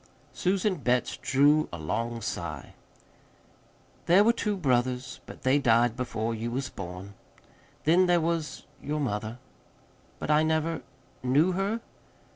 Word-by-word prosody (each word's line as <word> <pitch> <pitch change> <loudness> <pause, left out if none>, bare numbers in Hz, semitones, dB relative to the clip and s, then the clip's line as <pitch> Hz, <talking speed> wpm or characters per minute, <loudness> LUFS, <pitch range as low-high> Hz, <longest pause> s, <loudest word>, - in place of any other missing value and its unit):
Susan 190 0 0
Betts 125 -2 0
drew 145 +3 +3
a 85 - -5
long 115 +9 -3
sigh. 80 -5 -5 1.3
"There 185 +4 +6
were 230 +2 +4
two 210 -3 -1
brothers, 125 -4 0
but - - -11
they 130 +2 +4
died 120 -2 +3
before 115 -3 -2
you 115 +1 -3
was 130 +2 -3
born. 90 +2 -8 0.7
Then 175 +4 +4
there 175 -1 +4
was 165 -1 -2 0.2
your 150 +2 -2
mother." 110 -3 -2 0.8
"But - - -2
I 150 0 +5
never 160 +1 0 0.4
knew 145 +8 +3
her?" 195 +5 -1
135 Hz, 130 wpm, -28 LUFS, 115-165 Hz, 1.3 s, There